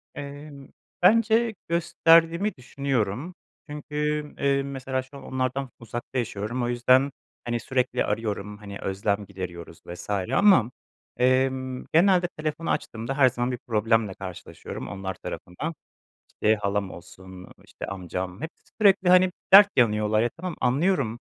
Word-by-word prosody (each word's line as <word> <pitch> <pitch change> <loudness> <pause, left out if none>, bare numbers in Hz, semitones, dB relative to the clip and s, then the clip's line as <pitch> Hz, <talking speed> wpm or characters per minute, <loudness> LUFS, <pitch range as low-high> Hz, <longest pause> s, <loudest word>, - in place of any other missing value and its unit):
Emm, 140 0 -9 0.3
bence 225 +4 +4 0.2
gösterdiğimi 170 +3 +3
düşünüyorum. 130 - -2 0.3
Çünkü, 150 0 -2
emm, 140 0 +1
mesela, 130 -1 -3
şu 130 +2 -13
an - - -12
onlardan 130 +1 -2
uzakta 120 +3 -6
yaşıyorum. 115 +2 -3
O 120 - 0
yüzden, 130 +3 +3 0.3
hani, 120 0 -1
sürekli 125 +2 0
arıyorum, 105 -2 -3
hani, 100 -1 -9
özlem 100 +1 -1
gideriyoruz 90 -4 -8
vs. 85 +3 -9
ama, 120 - +3 0.5
emm, 130 0 +1
genelde 180 +1 +4
telefonu 155 +1 -2
açtığımda 120 +5 -3
her 130 -2 +6
zaman 120 +1 -2
bir 125 - -3
problemle 110 -2 +1
karşılaşıyorum 95 -2 -8
onlar 95 0 -5
tarafından. 90 - -6 0.6
İşte, 110 +1 +2
halam 100 -1 -2
olsun, 90 +2 -12 0.2
ııı, - - -13
işte, - - -8
amcam... 90 0 -5
Hepsi 160 - -8 0.2
sürekli, 195 -3 +5
hani, 185 0 +6 0.2
dert 200 +1 +10
yanıyorlar. 110 -2 +3
Ya, 120 - +2
tamam 180 +1 -5
anlıyorum, 130 - +1
130 Hz, 130 wpm, -25 LUFS, 105-150 Hz, 0.6 s, dert